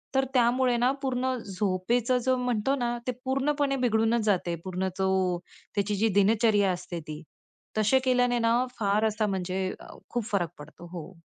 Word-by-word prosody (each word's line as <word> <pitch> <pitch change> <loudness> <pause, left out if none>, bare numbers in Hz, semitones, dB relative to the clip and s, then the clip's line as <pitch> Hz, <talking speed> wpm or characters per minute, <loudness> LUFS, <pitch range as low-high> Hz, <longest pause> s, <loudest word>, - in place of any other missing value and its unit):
तर 270 - +3
त्यामुळे 245 0 +3
ना 245 +2 +3
पूर्ण 260 -1 0
झोपेचं 210 +5 0
जो 260 0 +3
म्हणतो 250 +1 0
ना, 240 -2 -1
ते - - +2
पूर्णपणे 275 +1 +1
बिघडूनच 225 0 +2
जाते, 180 -4 +1
पूर्ण 185 0 -2
तो 190 -2 +1 0.4
त्याची 205 0 0
जी 220 +3 +2
दिनचर्या 205 -1 +3
असते 175 -1 -5
ती. 155 +1 -6 0.6
तसे 215 +5 +4
केल्याने 245 -1 +3
ना 235 +2 +2
फार 210 +1 +2
असा 215 0 0
म्हणजे 190 0 -2
अ, - - -12
खूप 240 -2 -2
फरक 175 -5 +1
पडतो. 155 +3 -12
हो. 170 +1 -9
220 Hz, 160 wpm, -27 LUFS, 190-245 Hz, 0.6 s, तसे